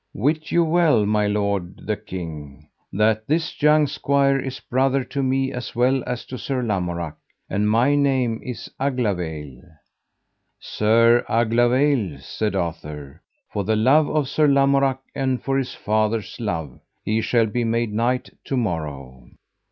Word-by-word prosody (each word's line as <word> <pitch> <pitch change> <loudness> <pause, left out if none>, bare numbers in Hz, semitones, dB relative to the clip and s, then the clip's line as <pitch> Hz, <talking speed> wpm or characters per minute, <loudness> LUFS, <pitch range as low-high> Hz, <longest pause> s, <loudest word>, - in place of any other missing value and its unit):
Wit 155 +7 -1
you 170 - +4
well, 160 -9 +3
my 105 0 +1
lord 100 -3 -2
the 105 - 0
king, 80 -7 -8 0.2
that 110 +2 +1
this 160 +2 -1
young 150 0 +5
squire 140 -1 +1
is 130 -1 -5
brother 135 +1 +1
to 140 +2 -4
me 135 0 0
as 125 -1 -6
well 130 +2 +2
as 125 -1 -4
to 130 - -7
Sir 130 -2 -2
Lamorak, 90 -7 -2 0.3
and 105 +2 0
my 120 +6 +3
name 130 -5 +1
is 125 -3 -6
Aglavale. 90 - -2 1.0
Sir 115 +2 +3
Aglavale, 120 - +2
said 105 +8 -3
Arthur, 75 -5 -5 0.3
for 100 - -1
the 110 +3 +1
love 135 +8 +4
of 150 -3 0
Sir 150 +3 +2
Lamorak, 140 -1 +3 0.2
and 130 -2 -1
for 135 - -1
his 135 -2 -2
father's 110 0 -1
love, 80 - -4 0.3
he 110 +1 +1
shall 115 0 +2
be 120 +3 -2
made 115 -1 0
knight 120 +3 0
to 135 - -2
morrow. 70 - -4
115 Hz, 145 wpm, -22 LUFS, 100-135 Hz, 1.0 s, young